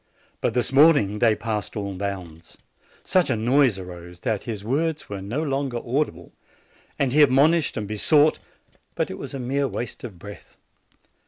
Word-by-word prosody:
But 115 Hz, -, 0 dB
this 125 Hz, +1 st, 0 dB
morning 135 Hz, -9 st, +5 dB
they 110 Hz, -1 st, +4 dB
passed 110 Hz, 0 st, -4 dB
all 100 Hz, -1 st, -3 dB
bounds. 90 Hz, -4 st, -6 dB, 0.5 s
Such 185 Hz, -4 st, +2 dB
a 130 Hz, -, +2 dB
noise 120 Hz, 0 st, +3 dB
arose, 90 Hz, -1 st, -10 dB
that 110 Hz, -3 st, -1 dB
his 105 Hz, -3 st, -5 dB
words 150 Hz, +7 st, -1 dB
were 100 Hz, -1 st, -5 dB
no 115 Hz, +11 st, -3 dB
longer 135 Hz, -4 st, -2 dB
audible, 130 Hz, +6 st, -2 dB, 0.7 s
and 130 Hz, -2 st, 0 dB
he 150 Hz, -, +5 dB
admonished 145 Hz, +3 st, +4 dB
and 105 Hz, -2 st, -3 dB
besought; 145 Hz, +9 st, +3 dB, 0.6 s
but -, -, -1 dB
it -, -, -7 dB
was -, -, -7 dB
a -, -, -4 dB
mere 135 Hz, +3 st, -1 dB
waste 120 Hz, -1 st, -6 dB
of 110 Hz, -8 st, -8 dB
breath. 100 Hz, +4 st, -12 dB
120 Hz, 165 wpm, -24 LUFS, 100-140 Hz, 0.7 s, morning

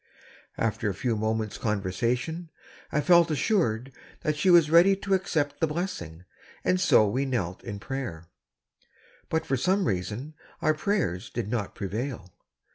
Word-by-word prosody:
After 110 Hz, -1 st, 0 dB
a 95 Hz, -, -3 dB
few 115 Hz, +3 st, -1 dB
moments' 110 Hz, 0 st, -2 dB
conversation, 120 Hz, -, -1 dB, 0.4 s
I 150 Hz, -, +1 dB
felt 170 Hz, 0 st, +5 dB
assured 135 Hz, -, 0 dB, 0.3 s
that 155 Hz, -, 0 dB
she 150 Hz, +5 st, +1 dB
was 170 Hz, -3 st, +6 dB
ready 175 Hz, +4 st, +7 dB
to 195 Hz, 0 st, -2 dB
accept 160 Hz, -6 st, 0 dB
the 160 Hz, -, +2 dB
blessing, 150 Hz, -, -4 dB, 0.4 s
and 185 Hz, 0 st, +2 dB
so 110 Hz, -, +5 dB
we 130 Hz, +7 st, 0 dB
knelt 110 Hz, -10 st, -2 dB
in 100 Hz, -, -5 dB
prayer; 120 Hz, -8 st, -5 dB, 1.0 s
but 160 Hz, -, 0 dB
for 135 Hz, -, 0 dB
some 190 Hz, +8 st, +2 dB
reason 105 Hz, -, -3 dB, 0.3 s
our 155 Hz, -, +2 dB
prayers 155 Hz, -, -1 dB
did 100 Hz, -, -4 dB
not 110 Hz, -5 st, -2 dB
prevail. 100 Hz, -2 st, -4 dB
130 Hz, 145 wpm, -27 LUFS, 105-165 Hz, 1.0 s, ready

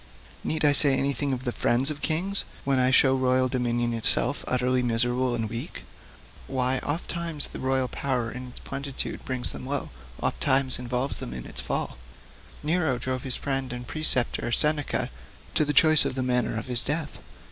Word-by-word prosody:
Need 155 Hz, -1 st, -1 dB
I 145 Hz, -, +5 dB
say 140 Hz, -1 st, +4 dB
anything 140 Hz, +1 st, 0 dB
of 130 Hz, -1 st, -3 dB
the 125 Hz, -, -1 dB
friends 125 Hz, +5 st, +1 dB
of 150 Hz, -, -7 dB
kings, 185 Hz, +5 st, 0 dB, 0.2 s
when 135 Hz, -1 st, +2 dB
I 125 Hz, 0 st, +4 dB
show 130 Hz, 0 st, +5 dB
royal 130 Hz, 0 st, +2 dB
dominion 120 Hz, -2 st, -1 dB
itself 115 Hz, -1 st, +2 dB
so -, -, -11 dB
utterly 125 Hz, 0 st, +1 dB
and 125 Hz, -, 0 dB
miserably 120 Hz, 0 st, +1 dB
weak 115 Hz, +2 st, -6 dB, 0.6 s
why 130 Hz, 0 st, +1 dB
ofttimes 165 Hz, +1 st, -2 dB
the -, -, -7 dB
royal 130 Hz, 0 st, 0 dB
power 125 Hz, -4 st, -2 dB
in 125 Hz, 0 st, -7 dB
its 125 Hz, -, -10 dB
plenitude 135 Hz, 0 st, -5 dB
brings 130 Hz, -2 st, -1 dB
them 130 Hz, -, -6 dB
low, 140 Hz, -, -2 dB, 0.3 s
ofttimes 135 Hz, -2 st, +1 dB
involves 125 Hz, +2 st, -2 dB
them -, -, -5 dB
in -, -, -6 dB
its -, -, -4 dB
fall? -, -, -3 dB, 0.7 s
Nero 155 Hz, -4 st, +1 dB
drove 130 Hz, +1 st, -3 dB
his 130 Hz, -2 st, 0 dB
friend 135 Hz, -2 st, -2 dB
and 125 Hz, 0 st, -5 dB
preceptor, 125 Hz, -5 st, +2 dB
Seneca, 150 Hz, -, +2 dB, 0.4 s
to -, -, +3 dB
the 150 Hz, -, 0 dB
choice 155 Hz, +1 st, +6 dB
of 140 Hz, -2 st, -2 dB
the 130 Hz, -, -1 dB
manner 125 Hz, -2 st, 0 dB
of 115 Hz, -, -4 dB
his 125 Hz, -2 st, +1 dB
death. 150 Hz, +1 st, -3 dB
130 Hz, 180 wpm, -26 LUFS, 125-140 Hz, 0.7 s, choice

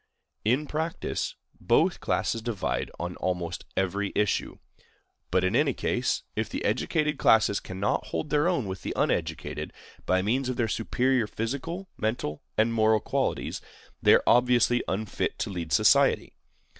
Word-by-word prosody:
In 125 Hz, +8 st, +2 dB
practice, 160 Hz, +3 st, -3 dB, 0.2 s
both -, -, +2 dB
classes 115 Hz, -, -1 dB
divide 110 Hz, -4 st, -2 dB
on 90 Hz, +1 st, -4 dB
almost 90 Hz, -2 st, -3 dB
every 95 Hz, +1 st, 0 dB
issue. 105 Hz, -1 st, 0 dB, 0.7 s
But, 95 Hz, -, +2 dB
in 95 Hz, +4 st, +1 dB
any 140 Hz, 0 st, +3 dB
case, 125 Hz, +1 st, -1 dB
if 110 Hz, 0 st, -1 dB
the -, -, -4 dB
educated 150 Hz, +7 st, 0 dB
classes 105 Hz, -2 st, +4 dB
cannot 95 Hz, +2 st, -2 dB
hold 155 Hz, -, -4 dB
their 150 Hz, +2 st, +3 dB
own 175 Hz, -, +1 dB
with 95 Hz, -1 st, -5 dB
the -, -, -4 dB
uneducated, -, -, -1 dB, 0.4 s
by 95 Hz, 0 st, +2 dB
means 125 Hz, +5 st, 0 dB
of 130 Hz, -, -1 dB
their 120 Hz, -3 st, 0 dB
superior 125 Hz, +2 st, +1 dB
physical, 140 Hz, -, -4 dB
mental, 110 Hz, -9 st, -2 dB, 0.2 s
and 110 Hz, +1 st, +3 dB
moral 110 Hz, -1 st, +4 dB
qualities, -, -, -2 dB, 0.4 s
they -, -, +7 dB
are -, -, +2 dB
obviously 120 Hz, 0 st, +4 dB
unfit 105 Hz, +2 st, -2 dB
to -, -, -3 dB
lead 85 Hz, -4 st, -5 dB
society. -, -, +4 dB
110 Hz, 145 wpm, -27 LUFS, 100-130 Hz, 0.7 s, they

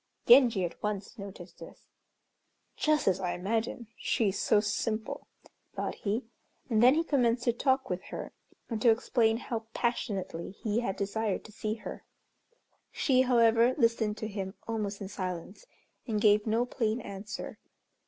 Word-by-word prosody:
Genji 235 Hz, -6 st, +6 dB
at 170 Hz, -, -7 dB
once 210 Hz, +2 st, -4 dB
noticed 195 Hz, -3 st, -9 dB
this. -, -, -12 dB, 0.9 s
"Just 305 Hz, -1 st, +1 dB
as 190 Hz, -1 st, +3 dB
I 180 Hz, -2 st, -1 dB
imagined. 225 Hz, +5 st, -2 dB
She 220 Hz, -4 st, +1 dB
is 195 Hz, -, -3 dB
so 210 Hz, -, +4 dB
simple," 215 Hz, +1 st, -2 dB, 0.5 s
thought -, -, -2 dB
he, 220 Hz, +4 st, -2 dB, 0.5 s
and 220 Hz, -1 st, +4 dB
then 250 Hz, +4 st, +7 dB
he 325 Hz, -, +2 dB
commenced 245 Hz, -6 st, +2 dB
to 240 Hz, -, +2 dB
talk 265 Hz, +2 st, +1 dB
with 180 Hz, 0 st, -4 dB
her, -, -, -7 dB, 0.3 s
and 225 Hz, -3 st, -3 dB
to 235 Hz, -, +6 dB
explain 225 Hz, -1 st, +3 dB
how 225 Hz, -2 st, -5 dB
passionately 195 Hz, -7 st, -2 dB
he 215 Hz, 0 st, +1 dB
had 195 Hz, -5 st, -2 dB
desired 205 Hz, +1 st, -2 dB
to 215 Hz, -, -11 dB
see 215 Hz, 0 st, -3 dB
her. 225 Hz, -, -8 dB, 0.9 s
She, 255 Hz, -3 st, +3 dB
however, 235 Hz, -1 st, +4 dB
listened 230 Hz, -4 st, +2 dB
to 215 Hz, -, -4 dB
him 195 Hz, -1 st, -5 dB
almost 210 Hz, -3 st, -3 dB
in 195 Hz, -, -4 dB
silence, 185 Hz, -, -6 dB, 0.4 s
and 215 Hz, -3 st, 0 dB
gave 210 Hz, 0 st, +4 dB
no 225 Hz, +3 st, +2 dB
plain 230 Hz, -2 st, -1 dB
answer. 200 Hz, +2 st, -7 dB
220 Hz, 155 wpm, -30 LUFS, 200-235 Hz, 0.9 s, then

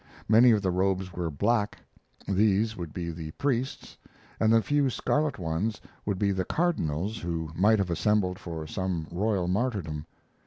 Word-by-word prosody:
Many 115 Hz, +3 st, +7 dB
of 105 Hz, -3 st, +3 dB
the 95 Hz, -, +1 dB
robes 95 Hz, 0 st, 0 dB
were 85 Hz, -1 st, -2 dB
black 105 Hz, -, 0 dB, 0.5 s
these 105 Hz, +2 st, +2 dB
would 85 Hz, -5 st, -6 dB
be 85 Hz, 0 st, -4 dB
the 80 Hz, -1 st, -6 dB
priests 130 Hz, -1 st, -2 dB, 0.4 s
and 110 Hz, 0 st, +4 dB
the 115 Hz, -1 st, +5 dB
few 145 Hz, -2 st, +2 dB
scarlet 150 Hz, +3 st, 0 dB
ones 90 Hz, +6 st, -2 dB, 0.3 s
would 100 Hz, -2 st, 0 dB
be 100 Hz, +1 st, +2 dB
the 95 Hz, -1 st, 0 dB
cardinals 105 Hz, -, -1 dB
who 80 Hz, -2 st, -3 dB
might 105 Hz, +6 st, +4 dB
have 95 Hz, -3 st, -1 dB
assembled 90 Hz, +2 st, +1 dB
for 80 Hz, -3 st, -6 dB
some 90 Hz, 0 st, -2 dB
royal 95 Hz, 0 st, 0 dB
martyrdom. 90 Hz, -7 st, -1 dB
95 Hz, 160 wpm, -28 LUFS, 85-110 Hz, 0.5 s, Many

